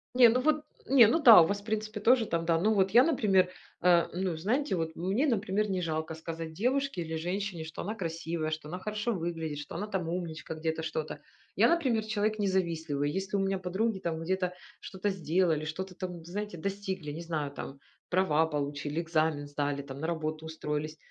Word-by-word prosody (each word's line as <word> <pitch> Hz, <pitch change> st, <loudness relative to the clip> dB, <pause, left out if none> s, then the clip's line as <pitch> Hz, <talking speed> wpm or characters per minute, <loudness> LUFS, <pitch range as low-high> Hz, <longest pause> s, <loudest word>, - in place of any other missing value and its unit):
Не 245 Hz, -2 st, +8 dB
ну 245 Hz, +3 st, +2 dB
вот 305 Hz, +2 st, +2 dB, 0.2 s
не 260 Hz, -3 st, +7 dB
ну 285 Hz, +9 st, +2 dB
да, 230 Hz, -9 st, +10 dB
у 160 Hz, -, +4 dB
вас, 200 Hz, +2 st, -2 dB
в -, -, -20 dB
принципе, 215 Hz, 0 st, -3 dB
тоже 235 Hz, +2 st, +4 dB
там, 165 Hz, -4 st, -1 dB
да. 165 Hz, -1 st, +2 dB
Ну 215 Hz, +5 st, +3 dB
вот 190 Hz, -2 st, +2 dB
я, 240 Hz, +4 st, +7 dB
например, 200 Hz, -, +3 dB, 0.3 s
а, 175 Hz, -1 st, +4 dB
ну 180 Hz, -2 st, -1 dB
знаете, 225 Hz, -, 0 dB
вот 160 Hz, -1 st, -3 dB
мне, 195 Hz, -, 0 dB
например, 210 Hz, -3 st, 0 dB
не 185 Hz, -2 st, -1 dB
жалко 160 Hz, -1 st, -2 dB
сказать 160 Hz, 0 st, -6 dB
девушке 260 Hz, -, 0 dB
или 160 Hz, -1 st, -4 dB
женщине, 180 Hz, 0 st, -3 dB
что 160 Hz, +1 st, -7 dB
она 210 Hz, -, -3 dB
красивая, 165 Hz, -4 st, -3 dB
что 155 Hz, -1 st, -5 dB
она 180 Hz, +3 st, -5 dB
хорошо 210 Hz, +4 st, -2 dB
выглядит, 165 Hz, -4 st, -3 dB
что 145 Hz, -, -8 dB
она 205 Hz, +5 st, -3 dB
там 190 Hz, -5 st, -2 dB
умничка 165 Hz, -2 st, -4 dB
где-то, 160 Hz, 0 st, -2 dB
что-то. 155 Hz, -1 st, -4 dB, 0.4 s
Я, -, -, +5 dB
например, 260 Hz, -11 st, +1 dB
человек 215 Hz, 0 st, 0 dB
не 205 Hz, -, +1 dB
завистливый, 160 Hz, -6 st, 0 dB
если 190 Hz, +4 st, -3 dB
у -, -, +2 dB
меня 195 Hz, 0 st, 0 dB
подруги 190 Hz, +4 st, -1 dB
там 165 Hz, -3 st, -3 dB
где-то 180 Hz, +1 st, -1 dB, 0.3 s
что-то 190 Hz, +2 st, -3 dB
сделали, 165 Hz, -3 st, +1 dB
что-то 180 Hz, +4 st, -5 dB
там, 180 Hz, -2 st, -6 dB
знаете, 205 Hz, +1 st, -5 dB
достигли, 190 Hz, -3 st, -4 dB
не 155 Hz, +3 st, -6 dB
знаю, 155 Hz, -4 st, -3 dB
там 140 Hz, 0 st, -8 dB, 0.3 s
права 160 Hz, -4 st, +3 dB
получили, 145 Hz, +1 st, -2 dB
экзамен 155 Hz, -3 st, 0 dB
сдали 145 Hz, 0 st, -2 dB
там, 140 Hz, -1 st, -9 dB
на 160 Hz, -, -2 dB
работу 155 Hz, -1 st, -3 dB
устроились. 155 Hz, -1 st, -4 dB
175 Hz, 200 wpm, -30 LUFS, 160-205 Hz, 0.4 s, да